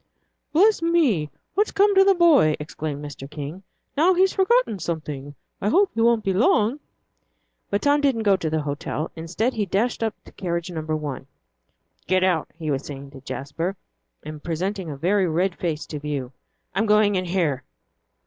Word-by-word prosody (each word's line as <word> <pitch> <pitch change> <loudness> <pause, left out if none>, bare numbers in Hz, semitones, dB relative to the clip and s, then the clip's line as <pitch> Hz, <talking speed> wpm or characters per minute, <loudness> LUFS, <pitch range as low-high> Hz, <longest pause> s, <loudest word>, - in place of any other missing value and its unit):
"Bless 395 +6 +4
me, 295 - +2 0.2
what's 415 +2 +2
come 405 +1 +3
to 385 0 +7
the 390 0 +4
boy!" 305 - +5
exclaimed 150 -2 -5
Mr. 140 -1 -8
King; 150 +4 -7 0.3
"now 345 +6 +4
he's 380 +2 +3
forgotten 390 - +2
something. 150 -4 -5 0.3
I 205 - +1
hope 385 - +3
he 230 - -1
won't 230 -1 +3
be 195 - 0
long." 220 +5 +3 0.9
But 200 - -1
Tom 290 0 +3
didn't 265 -6 +1
go 205 - +3
into 180 -4 0
the 155 -1 -1
hotel. 150 +1 -3
Instead, 175 +10 -1
he 210 -3 -1
dashed 220 +8 0
up 225 -1 -1
to - - -15
carriage 170 -2 -3
number 155 -2 -3
one. 145 -3 -5 0.8
"Get 185 0 +2
out," 180 -4 +1
he 155 -3 -3
was 135 0 -1
saying 140 -1 -8
to 135 -2 -12
Jasper, 165 +8 -4 0.5
and 155 -1 -8
presenting 180 +2 -3
a 145 - -6
very 185 +5 +2
red 175 +3 +1
face 160 -3 -2
to 150 - -6
view. 140 -4 -4 0.4
"I'm 220 +4 +1
going 210 -1 +4
in 185 -1 0
here." 170 -7 0
185 Hz, 175 wpm, -23 LUFS, 155-230 Hz, 0.9 s, to